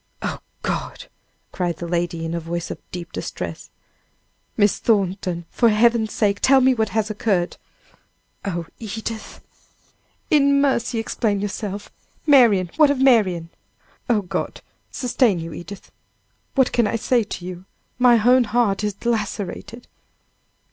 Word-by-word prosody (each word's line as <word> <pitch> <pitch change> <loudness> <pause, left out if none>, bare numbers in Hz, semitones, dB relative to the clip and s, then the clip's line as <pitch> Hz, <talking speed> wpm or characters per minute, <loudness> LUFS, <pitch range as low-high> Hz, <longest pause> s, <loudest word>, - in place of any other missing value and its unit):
"Oh, - - -3 0.2
God!" - - -3 0.5
cried 175 -3 -2
the 175 - -5
lady, 170 -1 -2
in 165 - -3
a 170 - -1
voice 170 +1 -4
of - - -6
deep 175 -1 -7
distress, - - -6 0.9
"Miss 205 -2 +3
Thornton! 190 -5 0
for 235 - +3
Heaven's 225 0 +3
sake! 200 -2 +1
tell 270 0 +5
me 260 0 +4
what 220 -3 0
has 215 +1 -1
occurred!" 195 -5 0 0.9
"Oh, 175 -4 -3
Edith!" 220 0 -6 0.9
"In 280 -2 +4
mercy, 245 -4 +1
explain 220 -2 -1
yourself 205 0 -5 0.3
Marian! 230 - +5
what 305 -2 +6
of 285 -2 0
Marian?" 195 -11 +3 0.6
"Oh, 215 -4 +2
God, 180 - -4 0.3
sustain 245 -5 +1
you, 165 -1 -6
Edith! 185 +5 -10 0.6
what 265 -2 +3
can 235 -3 +2
I - - -1
say 235 +1 +2
to 180 -3 -7
you? 180 0 -7 0.3
my 240 -2 +5
own 250 0 +6
heart 210 -3 +1
is 210 -2 -1
lacerated!" 225 +1 -3
210 Hz, 135 wpm, -22 LUFS, 180-240 Hz, 0.9 s, what